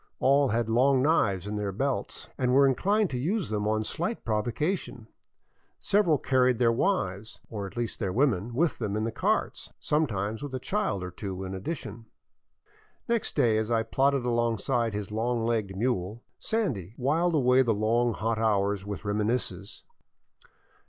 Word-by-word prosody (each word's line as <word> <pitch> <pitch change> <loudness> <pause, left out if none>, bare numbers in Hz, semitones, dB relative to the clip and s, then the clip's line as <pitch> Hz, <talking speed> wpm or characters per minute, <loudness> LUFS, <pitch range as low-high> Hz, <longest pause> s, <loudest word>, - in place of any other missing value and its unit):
All 140 +1 +4
had 115 -1 0
long 130 +3 +3
knives 100 - +2
in 105 +1 -3
their 105 -1 -2
belts 135 +7 -3
and 125 -1 0
were 140 0 +6
inclined 195 - +2
to 125 - -2
use 185 - -1
them 105 -1 -1
on 110 0 +1
slight 175 - -3
provocation. 120 - -2 0.7
Several 195 -7 +3
carried 130 -2 +2
their 115 -1 +3
wives, 110 - -1
or 100 -3 -4
at 95 - -13
least 120 -2 -3
their 95 -4 -1
women, 115 -2 +1
with 165 +3 +1
them 105 -3 -2
in 110 - -1
the 115 - -1
carts, - - -1
sometimes 110 -8 -1
with 145 -2 -5
a - - -2
child 190 - -1
or 90 - -5
two 95 0 -6
in 95 0 -5
addition. 115 - -6 1.0
Next 235 -1 -1
day 110 -2 +3
as 110 +1 -2
I 115 -1 +2
plodded 135 +3 +1
beside 120 -1 0
his 105 -1 -4
long 115 +1 -1
legged 110 -5 -1
mule, 110 -1 -1
" - - -49
Sandy 120 - -2
" - - -32
whiled 160 +6 +1
away 130 -2 +4
the 120 -3 +2
long, 115 +3 +1
hot 110 +2 -1
hours 100 -3 +1
with 100 +1 -6
reminiscences. 105 -2 -2
115 Hz, 170 wpm, -28 LUFS, 105-135 Hz, 1.0 s, were